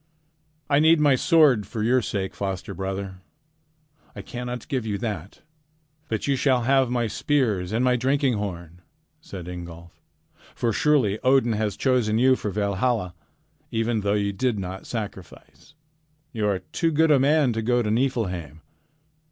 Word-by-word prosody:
"I 140 -1 +3
need 160 +1 +5
my 145 -2 +4
sword 135 - +4
for 110 -2 -4
your 125 +3 +3
sake, 100 -3 -3
foster 95 -2 -4
brother. 95 0 -5 0.9
I - - -7
cannot 125 -1 -6
give 130 -4 -2
you 105 -2 -2
that. 100 -5 -6 0.7
But 110 -2 -2
you 140 - +1
shall 130 -2 +2
have 135 0 +3
my 120 -1 0
spears 110 -7 0
and 115 +3 +1
my 125 0 +3
drinking 135 +1 +1
horn," 90 -5 -6 0.4
said 90 - -9
Ingolf. 85 -1 -9 0.5
"For 115 -2 0
surely 125 -7 +2
Odin 130 -3 +3
has 105 -2 -2
chosen 125 -5 +1
you 130 +2 +4
for 105 - -4
Valhalla, 100 0 -1 0.6
even 115 -1 -1
though 100 +1 +1
you 100 -1 -1
did 120 +3 0
not 95 0 -6
sacrifice. 105 - -8 0.6
You 110 -3 -1
are 100 -2 +1
too 165 - -2
good 160 0 +3
a 140 - +5
man 140 -2 +3
to 115 - -2
go 120 +2 +1
to 105 - -1
Niflheim. 95 - -2
115 Hz, 155 wpm, -24 LUFS, 100-130 Hz, 0.9 s, need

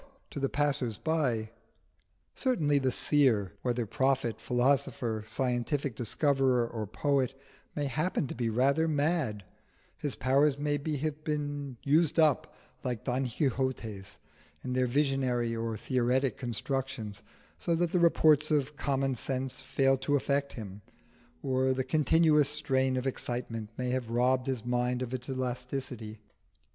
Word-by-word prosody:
to - - -5
the 135 -1 0
passers 140 -6 0
by. 125 -9 0 0.8
Certainly 155 - +1
the 130 -1 +1
seer, 125 -8 +2
whether 120 -1 -1
prophet, 130 +1 0
philosopher, 125 -3 +1
scientific 125 +3 -1
discoverer, 130 +1 +2
or 110 -3 -5
poet, 135 +3 0 0.4
may 145 - -1
happen 155 +4 0
to - - -5
be 115 -1 -1
rather 140 +8 +2
mad: 145 - 0 0.5
his 145 - -3
powers 140 +2 +3
may 145 0 0 0.2
have 155 +1 -3
been 145 -3 -3
used 155 +3 +3
up, 155 -5 +3 0.3
like 120 -4 -3
Don 130 +1 0
Quixote's, 115 - -2 0.5
in 125 - -3
their 130 0 +2
visionary 130 -3 +1
or 115 -1 -3
theoretic 125 +2 +1
constructions, 120 -3 -3 0.4
so 170 - 0
that 170 0 0
the 180 - +2
reports 155 -3 +4
of 150 -1 +1
common 135 -1 0
sense 130 +1 -3
fail 135 0 +2
to 145 +2 0
affect 140 0 0
him, 105 -3 -8 0.6
or 130 0 +1
the 130 - 0
continuous 150 +1 +4
strain 130 -3 +1
of 130 - -2
excitement 120 -4 -3
may 125 -1 -1
have 125 -3 -2
robbed 125 +2 +2
his 130 -4 -2
mind 125 +1 0
of 125 0 -6
its 130 0 -4
elasticity. 125 -3 -4
130 Hz, 135 wpm, -30 LUFS, 120-145 Hz, 0.8 s, reports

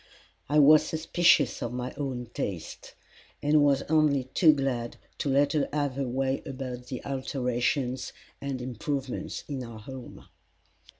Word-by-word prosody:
I 150 - +2
was 150 +1 +8
suspicious 160 -3 +2
of 120 0 -3
my 125 0 -4
own 130 -4 -4
taste, 90 -5 -5 0.5
and 150 +1 +4
was 140 -1 +3
only 150 -3 +3
too 160 -4 +7
glad 135 -5 -2 0.2
to 145 - -1
let 140 +3 +3
her 150 -2 +1
have 145 -2 0
her 135 0 -2
way 135 +2 -1
about 130 -2 -6
the 130 - -6
alterations 130 -1 -1 0.3
and 135 -3 -3
improvements 130 +2 -4
in 135 -3 -4
our 115 -2 -9
home. 130 +2 -10
135 Hz, 140 wpm, -28 LUFS, 125-145 Hz, 0.5 s, was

